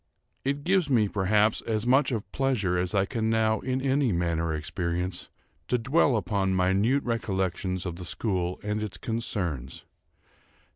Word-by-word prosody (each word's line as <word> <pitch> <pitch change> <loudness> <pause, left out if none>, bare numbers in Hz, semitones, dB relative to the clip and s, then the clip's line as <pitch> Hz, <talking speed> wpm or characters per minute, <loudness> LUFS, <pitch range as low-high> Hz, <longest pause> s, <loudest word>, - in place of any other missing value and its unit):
It 140 +1 -1
gives 185 -2 +2
me, 115 -6 +4
perhaps, 105 +2 +2
as 110 -1 -2
much 135 +3 +4
of 110 -4 -3
pleasure 125 -10 0
as 90 +2 -1
I 100 -1 +3
can 110 +1 -1
now 110 -1 +2
in 130 0 -1
any 135 -2 +2
manner 85 -2 0
experience, 85 +3 -3 0.4
to 125 - +2
dwell 135 +1 +3
upon 95 -1 0
minute 100 +9 +2
recollections 95 -5 -1
of 85 -2 -4
the 90 - -7
school 90 -2 -2
and 105 +1 -1
its 100 -4 -4
concerns. 90 - -3
105 Hz, 150 wpm, -27 LUFS, 90-120 Hz, 0.4 s, me